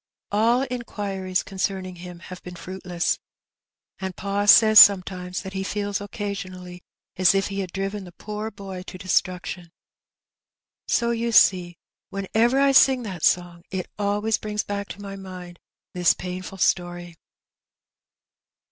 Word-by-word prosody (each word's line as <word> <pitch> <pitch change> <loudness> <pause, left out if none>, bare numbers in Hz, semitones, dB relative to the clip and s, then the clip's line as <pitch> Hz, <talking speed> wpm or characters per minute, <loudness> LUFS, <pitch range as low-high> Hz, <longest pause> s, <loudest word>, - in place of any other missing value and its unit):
AU 230 +5 +3
inquiries 200 -6 -3
concerning 190 -1 -3
him 175 0 -10
have 185 0 -10
been 180 0 -9
fruitless. 180 0 -3 0.8
And 190 -1 -5
pa 200 +1 -2
says 215 0 +8
sometimes 185 -2 +5
that 190 - -7
he 190 0 -2
feels 205 0 -2
occasionally 185 -3 -6 0.4
as 185 +1 +5
if 195 +1 +1
he 200 0 -4
had 185 -3 -4
driven 195 +2 -3
the 175 - -11
poor 210 +4 -6
boy 195 -3 -8
to 185 - -8
destruction. 180 -1 -1 1.2
So 235 0 +1
you 235 0 -1
see 180 -5 +4 0.3
when 195 -1 -5
ever 240 +4 +3
I 275 0 +4
sing 265 -1 +5
that 185 -7 -7
song 175 -1 +1
it 190 -2 -5
always 210 +2 0
brings 210 -1 -3
back 200 0 -4
to 205 - -9
my 195 0 -7
mind 185 -2 -10 0.3
this 180 -1 +3
painful 180 +1 -6
story." 175 -1 -1
195 Hz, 140 wpm, -24 LUFS, 180-205 Hz, 1.2 s, says